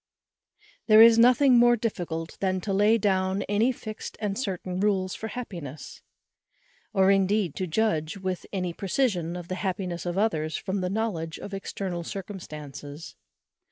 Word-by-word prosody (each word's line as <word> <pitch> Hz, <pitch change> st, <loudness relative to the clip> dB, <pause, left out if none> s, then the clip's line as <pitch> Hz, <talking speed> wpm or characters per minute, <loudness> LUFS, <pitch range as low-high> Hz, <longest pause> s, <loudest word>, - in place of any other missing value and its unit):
_ -, -, -33 dB, 0.2 s
There 215 Hz, 0 st, +9 dB
is 230 Hz, 0 st, +7 dB
nothing 250 Hz, +1 st, +6 dB
more 240 Hz, 0 st, +6 dB
difficult 170 Hz, -7 st, -4 dB
than 190 Hz, -1 st, 0 dB
to 200 Hz, 0 st, -2 dB
lay 210 Hz, +3 st, +4 dB
down 190 Hz, -1 st, +1 dB
any 215 Hz, +5 st, +2 dB
fixed 215 Hz, -3 st, -8 dB
and 205 Hz, -2 st, -2 dB
certain 185 Hz, -5 st, -3 dB
rules 190 Hz, -2 st, +1 dB
for 220 Hz, -, -5 dB
happiness; 170 Hz, -, -7 dB, 0.9 s
or 190 Hz, 0 st, +4 dB
indeed 195 Hz, -3 st, +2 dB
to 185 Hz, -, -2 dB
judge 165 Hz, -3 st, 0 dB
with 185 Hz, -2 st, -4 dB
any 180 Hz, -3 st, -2 dB
precision 185 Hz, -4 st, -1 dB
of 175 Hz, -1 st, -7 dB
the 185 Hz, -, -4 dB
happiness 180 Hz, -3 st, -3 dB
of 175 Hz, +1 st, -2 dB
others 160 Hz, -7 st, 0 dB
from 190 Hz, 0 st, -3 dB
the 180 Hz, -, -1 dB
knowledge 185 Hz, -6 st, -2 dB
of 200 Hz, -, -8 dB
external 190 Hz, -2 st, -4 dB
circumstances. 155 Hz, -6 st, -8 dB
190 Hz, 155 wpm, -26 LUFS, 175-215 Hz, 0.9 s, There